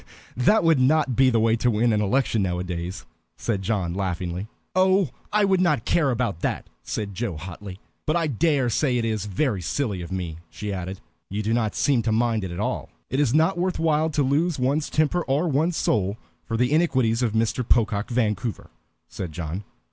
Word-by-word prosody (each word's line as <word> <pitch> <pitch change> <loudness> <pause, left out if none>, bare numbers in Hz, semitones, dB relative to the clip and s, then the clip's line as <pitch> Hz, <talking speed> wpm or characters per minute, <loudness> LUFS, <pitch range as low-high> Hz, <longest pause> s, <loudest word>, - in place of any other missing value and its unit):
"That 175 - +3
would 165 -4 +4
not 140 0 +3
be 130 +1 +5
the 115 -2 +2
way 115 0 +3
to 120 +2 +2
win 115 +1 +2
an 105 - +2
election 115 +1 +1
nowadays," 90 -1 -3 0.3
said 105 -5 -2
John, 95 -4 -1
laughing. 90 0 -3 0.3
"Oh, 185 -4 +3 0.2
I 210 0 +3
would 190 -2 +3
not 150 -10 +2
care 150 -5 +2
about 120 -8 -1
that," - - -2 0.2
said 100 -2 -4
Joe, 100 -4 -3
hotly. 90 +3 -8 0.3
"But 155 - +2
I 170 -1 +2
dare 145 -1 +1
say 125 +1 +1
it 115 - 0
is 110 -3 -1
very 105 0 0
silly 105 - -2
of 85 - -8
me," 90 -4 -4
she 105 -1 -5
added. 95 0 -5 0.3
"You 105 +2 -3
do 110 +2 0
not 110 -3 0
seem 140 -5 +2
to 110 0 0
mind 115 -1 +1
it 95 - -3
at 85 - -6
all." - - -2 0.2
"It 130 - 0
is 140 -2 +2
not 165 +3 +3
worth 185 +1 0
while 160 -1 +2
to 145 -2 +1
lose 150 +5 +1
one's 140 +4 0
temper 155 +3 +1
or 145 +6 +1
one's 160 +3 +1
soul 100 0 +1 0.3
for 115 - -1
the 125 +3 +2
iniquities 130 -8 +2
of 115 -4 +1
Mr. 115 +3 +1
Pocock 110 -3 +1
Vancouver," 110 - -1 0.4
said 90 -4 -6
John. 85 +4 -5
115 Hz, 200 wpm, -24 LUFS, 100-145 Hz, 0.4 s, be